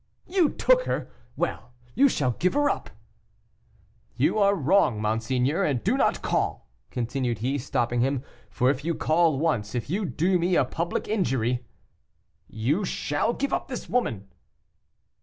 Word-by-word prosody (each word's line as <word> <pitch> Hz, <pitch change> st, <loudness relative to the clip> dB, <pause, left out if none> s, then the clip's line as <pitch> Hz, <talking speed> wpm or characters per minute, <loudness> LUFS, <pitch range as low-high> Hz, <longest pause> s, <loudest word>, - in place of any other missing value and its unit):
"You 355 Hz, -4 st, +2 dB
took -, -, +3 dB
her! -, -, -3 dB, 0.2 s
Well! 125 Hz, -, -3 dB, 0.2 s
you 280 Hz, +2 st, +5 dB
shall 135 Hz, -, 0 dB
give 180 Hz, -, 0 dB
her 290 Hz, -1 st, +3 dB
up." 115 Hz, -, -5 dB, 1.3 s
"You 145 Hz, -, +2 dB
are 200 Hz, 0 st, +4 dB
wrong, 150 Hz, -, +3 dB
monseigneur. 125 Hz, -, 0 dB
And 135 Hz, -9 st, 0 dB
do -, -, +2 dB
not -, -, +1 dB
call," -, -, -1 dB, 0.2 s
continue 125 Hz, 0 st, -2 dB
he, 130 Hz, +7 st, -2 dB
stopping 120 Hz, -1 st, 0 dB
him, 135 Hz, 0 st, 0 dB, 0.3 s
"for 130 Hz, 0 st, +2 dB
if 140 Hz, 0 st, -5 dB
you 165 Hz, +1 st, -1 dB
call 160 Hz, -2 st, +2 dB
once 125 Hz, -9 st, -1 dB
if 120 Hz, +4 st, -3 dB
you 200 Hz, +3 st, 0 dB
do 180 Hz, +3 st, +1 dB
me 175 Hz, +1 st, +1 dB
a 140 Hz, -, +4 dB
public 170 Hz, +6 st, -3 dB
injury 125 Hz, -, 0 dB, 0.4 s
" -, -, -46 dB, 0.2 s
"You 165 Hz, +9 st, +2 dB
shall 180 Hz, +4 st, -1 dB
give 280 Hz, +2 st, -2 dB
up -, -, -1 dB
this 255 Hz, -, -6 dB
woman." 115 Hz, -, -1 dB
145 Hz, 160 wpm, -26 LUFS, 125-195 Hz, 1.3 s, you